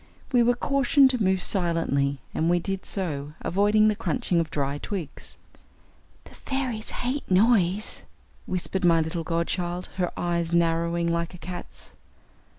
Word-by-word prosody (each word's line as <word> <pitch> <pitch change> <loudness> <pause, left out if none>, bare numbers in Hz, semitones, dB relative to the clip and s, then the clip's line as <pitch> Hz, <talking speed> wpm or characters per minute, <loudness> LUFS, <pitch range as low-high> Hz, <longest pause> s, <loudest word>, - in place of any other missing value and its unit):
We 245 -2 +4
were 240 +1 +3
cautioned 275 +1 +4
to 250 -3 -2
move 190 -2 +2
silently, 165 -7 +1 0.2
and 160 - +1
we 175 - +4
did 190 +2 -4
so, 150 -7 -3
avoiding 210 +3 +3
the 215 - +2
crunching 230 -5 0
of 165 -2 -1
dry 145 -2 -2
twigs. 180 -6 -6 0.9
"The - - -15
fairies 255 -5 -3
hate 255 +4 -3
noise," 200 0 +2 0.5
whispered 185 +1 -2
my 170 -2 +5
little 160 +1 -3
godchild, 175 +2 -2
her 180 -2 0
eyes 170 -1 -1
narrowing 170 0 +1
like 170 +1 -1
a - - -10
cat's. 175 +1 -7
180 Hz, 145 wpm, -26 LUFS, 170-215 Hz, 0.9 s, my